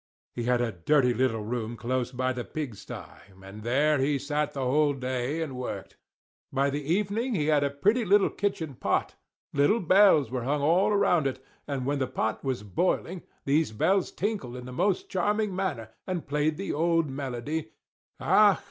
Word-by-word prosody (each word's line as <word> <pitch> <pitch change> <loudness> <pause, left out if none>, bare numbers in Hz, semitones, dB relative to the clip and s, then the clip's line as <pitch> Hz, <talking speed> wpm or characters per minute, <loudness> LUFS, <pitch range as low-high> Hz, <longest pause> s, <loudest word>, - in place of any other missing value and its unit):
He 120 - -4
had 125 0 +2
a 120 -2 0
dirty 125 - +2
little 115 -2 0
room 115 +1 -3
close 125 +1 -2
by 130 0 -1
the 125 -1 -4
pigsty; 125 -11 -6 0.4
and 100 +2 -10
there 140 +6 +2
he 140 +2 +2
sat 150 +2 -1
the 135 -2 -2
whole 145 +3 +3
day, 130 +4 -2
and 140 -5 -6
worked. 125 0 -6 0.6
By 140 +1 +1
the 145 +2 -2
evening 210 - 0
he 150 -5 0
had 150 -1 +3
made 140 - +2
a - - -19
pretty 210 - +2
little 200 0 +4
kitchen 170 -8 -2
pot. - - -1 0.4
Little 145 +11 +3
bells 185 - +5
were 125 -1 -2
hung 140 +4 -1
all 175 +7 +3
round 175 -7 +3
it; 130 0 -5 0.2
and 135 -3 -3
when 140 +1 0
the 130 - 0
pot 110 -3 -2
was 130 -5 -2
boiling, 175 - -1 0.2
these 150 -1 +2
bells 190 - +1
tinkled 195 - -3
in 125 -1 -7
the 125 - -8
most 190 +8 0
charming 205 +1 0
manner, 115 -13 -3 0.2
and 185 -3 -3
played 150 +2 0
the 195 - -3
old 165 +1 +2
melody, 135 +1 -4 0.5
"Ach! - - +5
140 Hz, 185 wpm, -27 LUFS, 125-170 Hz, 0.6 s, bells